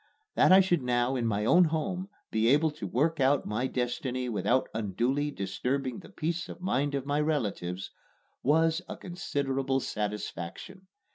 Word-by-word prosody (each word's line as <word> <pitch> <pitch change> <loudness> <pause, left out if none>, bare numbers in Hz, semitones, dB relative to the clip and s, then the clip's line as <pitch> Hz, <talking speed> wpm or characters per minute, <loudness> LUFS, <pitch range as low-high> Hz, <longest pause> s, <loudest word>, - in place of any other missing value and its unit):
That - - +5
I 190 +1 +9
should 180 -4 +2
now 125 +1 +1
in 120 -3 0
my 105 -1 0
own 175 +9 +6
home 180 +4 -2 0.2
be 110 +1 +2
able 150 +5 +4
to 145 -9 -6
work 150 - +1
out 135 +1 +3
my 115 +5 -1
destiny 125 0 -2
without 120 +3 +1
unduly 120 +7 0
disturbing 125 +4 -2
the - - -13
peace 170 -2 -3
of - - -8
mind 145 -6 0
of 140 -1 -2
relatives 140 - -1 0.5
was 160 +4 +3
a - - -5
considerable 135 -6 -1
satisfaction. 105 - -5
135 Hz, 150 wpm, -29 LUFS, 120-160 Hz, 0.5 s, I